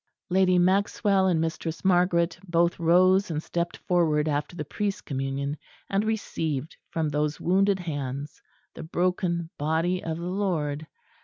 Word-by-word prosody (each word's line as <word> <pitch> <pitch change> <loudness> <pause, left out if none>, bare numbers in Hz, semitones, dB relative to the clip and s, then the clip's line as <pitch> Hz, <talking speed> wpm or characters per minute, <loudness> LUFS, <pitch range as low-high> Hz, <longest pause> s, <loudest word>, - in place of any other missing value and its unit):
Lady 185 -1 +4
Maxwell 195 +1 +3
and 175 -3 +2
Mistress 165 +1 -3
Margaret 175 -2 +3
both 170 +1 +2
rose 185 +4 +4
and 155 -1 -2
stepped 170 0 -2
forward 160 -4 +1
after 150 +3 -2
the 150 - -4
Priest's 200 +6 -2
Communion, 135 +1 -3 0.3
and 195 +1 +2
received 160 -9 -2
from 160 -2 -1
those 150 +1 -1
wounded 195 +2 +3
hands 145 -3 -5 0.3
the - - -8
Broken 170 0 -1
Body 165 +5 0
of 160 -1 -3
the 170 - -6
Lord. 165 -6 -1
170 Hz, 140 wpm, -26 LUFS, 150-185 Hz, 0.3 s, Lady